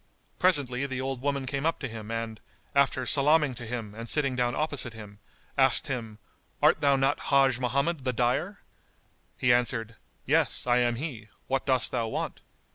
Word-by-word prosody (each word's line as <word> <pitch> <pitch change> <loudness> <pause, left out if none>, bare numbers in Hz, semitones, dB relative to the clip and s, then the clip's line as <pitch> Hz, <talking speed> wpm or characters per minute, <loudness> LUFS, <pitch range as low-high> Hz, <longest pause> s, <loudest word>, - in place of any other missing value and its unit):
Presently 140 -7 +2
the 130 -1 -4
old 135 -1 -3
woman 140 -1 -1
came 135 +2 -3
up 165 +1 +1
to 135 - -4
him 110 -2 -8
and, 115 -1 -4 0.3
after 140 -2 +2
salaming 150 +2 +4
to 120 -1 -8
him 115 -3 -5
and 115 +1 -7
sitting 140 -4 +1
down 120 0 0
opposite 145 -6 -1
him, 105 -2 -11 0.4
asked 135 -2 +3
him, 115 -6 -5 0.4
"Art - - +4
thou 140 -1 +4
not 135 +1 +1
Hajj 135 -2 +4
Mohammed 140 +5 0
the 130 - 0
dyer?" 125 - -1 0.8
He 125 -1 +4
answered, 115 -2 -1 0.3
"Yes, - - +1
I 120 0 +3
am 120 -1 +2
he: 120 -5 -6 0.2
what 135 +1 -2
dost 130 -3 +2
thou 115 - -1
want?" - - -4
130 Hz, 175 wpm, -28 LUFS, 120-140 Hz, 0.8 s, salaming